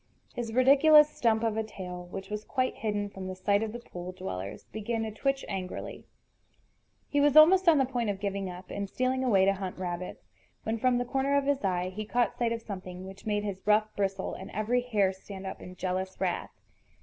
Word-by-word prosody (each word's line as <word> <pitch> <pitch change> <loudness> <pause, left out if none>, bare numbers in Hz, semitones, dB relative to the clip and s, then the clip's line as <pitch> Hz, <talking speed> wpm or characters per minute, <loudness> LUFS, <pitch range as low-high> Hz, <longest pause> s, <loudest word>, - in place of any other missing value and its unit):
His 235 -2 -4
ridiculous 290 +5 +7
stump 225 -1 +1
of 220 -1 0
a 220 - +1
tail, 180 -4 -7
which 195 +2 -7
was 210 0 -3
quite 255 +1 0
hidden 205 -2 -1
from 190 -2 -7
the 185 - -5
sight 200 +2 +2
of 220 -1 -2
the 235 - -5
pool 180 -6 -8
dwellers, 100 - -6
began 225 +1 -2
to 220 - -3
twitch 275 +5 -1
angrily. 190 -2 -5 1.0
He 285 - +1
was 290 0 +4
almost 360 +4 +8
on 320 - +6
the 270 - +4
point 245 -4 -1
of 195 -1 -2
giving 200 -1 -2
up, 180 +1 -9
and 200 -1 -3
stealing 255 +3 0
away 200 -7 +4
to 195 - +4
hunt 190 -1 -5
rabbits, 180 0 -5 0.4
when 225 +1 -2
from 255 +1 +3
the 245 - 0
corner 270 +2 +1
of 280 - +1
his 280 -3 +1
eye 180 -1 0
he 205 +3 -5
caught 240 +3 0
sight 235 -1 0
of 230 -1 -3
something 185 -3 -7
which 195 +3 -10
made 205 -1 0
his 200 -2 -4
ruff 215 0 +3
bristle 195 -1 -1
and 190 - -8
every 225 +4 +1
hair 210 -6 +1
stand 190 0 -10
up 190 - -6
in 180 - -9
jealous 185 +1 -3
wrath. 185 -2 -1
210 Hz, 215 wpm, -29 LUFS, 190-245 Hz, 1.0 s, almost